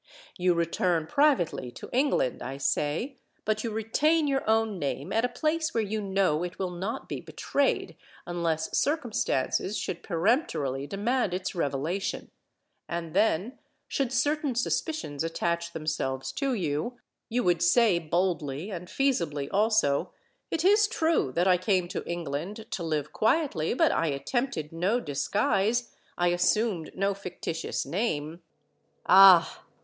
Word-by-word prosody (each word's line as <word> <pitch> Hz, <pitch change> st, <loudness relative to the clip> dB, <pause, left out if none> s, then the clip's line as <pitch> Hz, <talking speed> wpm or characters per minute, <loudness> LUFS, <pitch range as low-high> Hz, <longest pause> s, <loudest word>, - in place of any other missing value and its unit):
You 180 Hz, -1 st, +2 dB
return 170 Hz, 0 st, +1 dB
privately 250 Hz, -, +2 dB
to -, -, -9 dB
England, 255 Hz, -, +1 dB
I 135 Hz, +3 st, -5 dB
say—but 215 Hz, -, -2 dB
you 230 Hz, -, -1 dB
retain 290 Hz, +9 st, +1 dB
your 270 Hz, -1 st, +1 dB
own 220 Hz, -3 st, +2 dB
name 145 Hz, +3 st, -3 dB
at 225 Hz, -, +2 dB
a 250 Hz, -, +1 dB
place 315 Hz, +4 st, -1 dB
where 225 Hz, -, +2 dB
you 215 Hz, +1 st, -2 dB
know 190 Hz, -6 st, +1 dB
it 180 Hz, +1 st, -5 dB
will 185 Hz, -2 st, -2 dB
not 190 Hz, +6 st, -4 dB
be -, -, -5 dB
betrayed 280 Hz, -1 st, -1 dB, 0.3 s
unless 165 Hz, -2 st, -2 dB
circumstances 230 Hz, -, 0 dB
should 170 Hz, -, -4 dB
peremptorily 165 Hz, -, 0 dB
demand 205 Hz, -, 0 dB
its 185 Hz, 0 st, -3 dB
revelation; 165 Hz, +4 st, -2 dB, 0.6 s
and 170 Hz, -2 st, -4 dB
then, 210 Hz, +4 st, +1 dB, 0.3 s
should 270 Hz, -3 st, -1 dB
certain 290 Hz, +1 st, 0 dB
suspicions 245 Hz, -, -2 dB
attach 170 Hz, +1 st, -2 dB
themselves 135 Hz, -5 st, -3 dB
to 275 Hz, -3 st, -1 dB
you, 170 Hz, +6 st, -2 dB, 0.3 s
you 245 Hz, +1 st, 0 dB
would 175 Hz, -2 st, +2 dB
say 180 Hz, +1 st, +4 dB
boldly 165 Hz, 0 st, -1 dB
and 180 Hz, -2 st, -6 dB
feasibly 170 Hz, -, 0 dB
also—'It 215 Hz, -, 0 dB
is 415 Hz, +2 st, +5 dB
true 320 Hz, -, +1 dB
that 175 Hz, +2 st, +2 dB
I 180 Hz, -1 st, +5 dB
came 185 Hz, -1 st, +1 dB
to -, -, -4 dB
England 170 Hz, +6 st, -4 dB
to -, -, -3 dB
live 155 Hz, -2 st, -2 dB
quietly; 220 Hz, -, +1 dB
but 325 Hz, +3 st, +4 dB
I 165 Hz, -, +1 dB
attempted 155 Hz, -, -2 dB
no 185 Hz, +9 st, +1 dB
disguise—I 200 Hz, -, -1 dB
assumed 180 Hz, 0 st, +1 dB
no 195 Hz, +1 st, +1 dB
fictitious 180 Hz, -4 st, -4 dB
name.' 165 Hz, -5 st, -2 dB, 0.6 s
Ah! 190 Hz, -2 st, +7 dB
185 Hz, 135 wpm, -28 LUFS, 165-240 Hz, 0.6 s, Ah